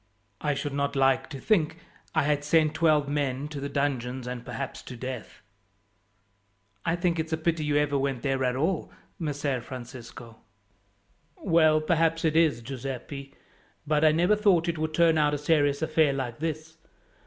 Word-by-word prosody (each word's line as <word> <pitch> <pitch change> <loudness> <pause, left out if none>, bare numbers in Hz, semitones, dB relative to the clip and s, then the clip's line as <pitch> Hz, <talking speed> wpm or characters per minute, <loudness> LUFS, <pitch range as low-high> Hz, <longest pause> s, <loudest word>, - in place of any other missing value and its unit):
I 150 -1 0
should 145 0 -3
not 140 0 -1
like 135 -1 +2
to 140 -4 -7
think 165 -3 +1 0.4
I 155 - +3
had 145 0 +1
sent 155 0 +3
twelve 155 -3 +3
men 140 -1 -1
to 150 -2 -6
the 140 +1 -4
dungeons 130 -3 -2
and 125 -1 -5
perhaps 135 +1 -5
to 125 - -9
death." 125 -3 -7 1.4
"I 165 - +1
think 175 -1 0
it's 160 0 -3
a - - +1
pity 160 0 0
you 145 0 +1
ever 145 -1 +1
went 135 -3 -2
there 135 -2 0
at 125 -1 +1
all, 160 +5 -1 0.3
Messer 145 -5 -2
Francisco." 120 -2 -10 1.0
"Well, 160 -4 +4
perhaps 165 0 +1
it 155 -1 +1
is, 155 -8 +3
Giuseppi; 135 +2 -6 0.5
but 150 0 +1
I 155 - +7
never 175 +6 +3
thought 195 -5 +3
it 170 -2 -1
would 155 0 -2
turn 165 -1 +4
out 150 -1 +3
a - - -1
serious 145 -1 +2
affair 155 -2 +3
like 130 -3 -4
this. 160 0 -4
145 Hz, 170 wpm, -27 LUFS, 135-160 Hz, 1.4 s, I